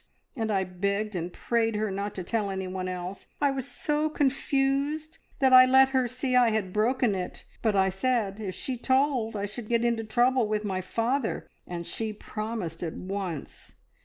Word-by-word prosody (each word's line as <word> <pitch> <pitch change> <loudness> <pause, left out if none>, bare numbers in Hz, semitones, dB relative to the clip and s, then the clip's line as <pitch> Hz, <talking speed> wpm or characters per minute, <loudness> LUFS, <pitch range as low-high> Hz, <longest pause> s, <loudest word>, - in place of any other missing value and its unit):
and 225 -4 -2
I 195 -2 +2
begged 200 +3 -2
and 175 0 -3
prayed 225 +1 0
her 210 -1 -1
not 200 +1 -3
to 185 - -4
tell 210 +1 -1
anyone 190 -1 -3
else. 180 +1 -5
I 285 -1 +3
was 270 -1 -3
so 300 -1 0
confused 280 +2 0 0.2
that 265 -2 +4
I 255 0 +10
let 265 +1 +6
her 260 -2 +2
see 255 +1 -1
I 245 -2 +6
had 210 -4 -1
broken 230 +1 +2
it, 185 -2 -5 0.2
but 220 -3 +2
I 190 0 +4
said 210 0 0
if 190 -4 -4
she 260 -2 -3
told 260 -3 +1
I 200 0 -1
should 210 +2 -7
get 235 0 +2
into 235 -1 +1
trouble 240 +2 +2
with 210 0 -1
my 190 -2 -1
father, 230 +6 -1 0.2
and 170 -1 -5
she 220 +3 -3
promised 215 -6 -5
at 165 -3 -3
once. 185 -5 -5
220 Hz, 185 wpm, -28 LUFS, 195-255 Hz, 0.2 s, I